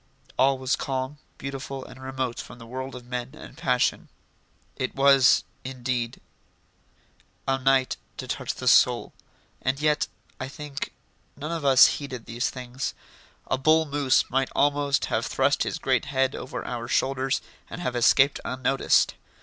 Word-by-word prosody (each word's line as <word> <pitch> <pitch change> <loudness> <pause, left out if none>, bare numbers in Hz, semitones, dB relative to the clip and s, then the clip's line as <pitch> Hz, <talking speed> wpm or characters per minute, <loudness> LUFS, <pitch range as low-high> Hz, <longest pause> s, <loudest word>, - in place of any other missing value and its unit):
All 135 0 +4
was 130 +1 0
calm, 135 +1 -3 0.2
beautiful, 135 0 -6
and 130 - -12
remote 130 -2 -3
from - - -8
the 115 - -11
world 130 +3 -6
of 125 -1 -9
men 125 +1 -5
and - - -11
passion. 125 -1 0 0.7
It 130 - -3
was, 135 -1 +6 0.2
indeed, 125 -2 -3 1.3
a 135 0 +1
night 135 0 +2 0.2
to - - -6
touch - - -3
the - - -5
soul, - - +4 0.5
and 135 +1 0
yet, 150 -1 +2 0.3
I 130 - -3
think, 145 0 -6 0.5
none 150 +3 -5
of 165 -2 -3
us 135 -2 +8
heeded 130 -5 -2
these 120 +2 -1
things. 125 +1 -5 0.5
A 130 - -1
bull 155 +3 +4
moose 140 -3 +2
might 135 +1 0
almost 145 -1 +2
have - - -1
thrust - - +2
his - - -1
great - - +1
head 135 -1 +1
over 130 - -6
our 120 -1 -4
shoulders 135 +1 +1 0.3
and - - -7
have 125 -8 -2
escaped 135 +4 +4
unnoticed. 130 +1 +2
130 Hz, 150 wpm, -26 LUFS, 130-140 Hz, 1.3 s, us